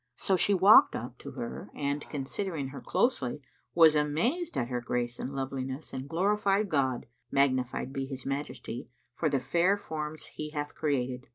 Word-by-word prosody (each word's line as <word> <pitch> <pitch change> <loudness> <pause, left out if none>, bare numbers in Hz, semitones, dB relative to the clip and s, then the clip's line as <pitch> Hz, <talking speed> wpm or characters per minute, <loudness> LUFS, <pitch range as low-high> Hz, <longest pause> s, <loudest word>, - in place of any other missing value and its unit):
So 190 - +1
she 200 +3 +3
walked 195 +3 +7
up 120 +2 -6
to - - -8
her 120 - -6
and, 145 0 -1
considering 145 +1 -3
her 140 - -8
closely, 145 - 0 0.4
was 165 -2 +8
amazed 175 - 0
at 120 - 0
her 125 -1 -2
grace 120 0 -2
and 130 - -4
loveliness 135 +1 -4
and 130 +1 -5
glorified 200 +3 +2
God 130 -6 +1 0.2
(magnified 130 -1 +1
be 135 -1 -3
His 135 -2 -6
majesty!) 135 -3 -4 0.2
for 155 - 0
the 140 - +1
fair 175 +9 +2
forms 155 -5 -5
He 150 - -6
hath 145 -1 -4
created. 130 -3 -1
145 Hz, 165 wpm, -30 LUFS, 130-170 Hz, 0.4 s, was